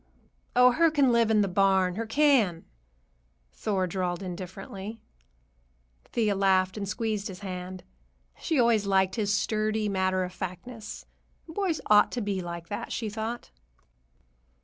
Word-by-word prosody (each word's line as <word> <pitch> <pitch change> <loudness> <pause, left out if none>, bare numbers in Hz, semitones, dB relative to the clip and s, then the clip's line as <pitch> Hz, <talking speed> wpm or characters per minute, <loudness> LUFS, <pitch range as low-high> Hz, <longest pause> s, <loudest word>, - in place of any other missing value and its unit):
"Oh, 250 0 +7
her 330 +5 +4
can 285 -5 +3
live 235 -1 +3
in 215 -1 +4
the 200 - +2
barn, 190 -1 +3
her 225 +4 -4
can," 235 - +3 0.9
Thor 195 -3 -1
drawled 180 0 -2
indifferently. 190 +4 -7 1.1
Thea 215 -3 0
laughed 190 -1 +2
and 200 -2 -4
squeezed 215 -1 -2
his 190 -2 -9
hand. 185 -1 -6 0.6
She 315 - 0
always 230 -4 +3
liked 190 -1 +3
his 210 -3 0
sturdy 215 +1 0
matter 190 -1 +1
of 180 0 -5
factness. 210 +6 -7 0.4
Boys 335 0 -1
ought 210 -1 +5
to 245 - -2
be 200 -3 -2
like 170 -1 -6
that, 205 - -5
she 220 -3 -3
thought. 225 +2 -5
205 Hz, 140 wpm, -28 LUFS, 185-230 Hz, 1.1 s, Oh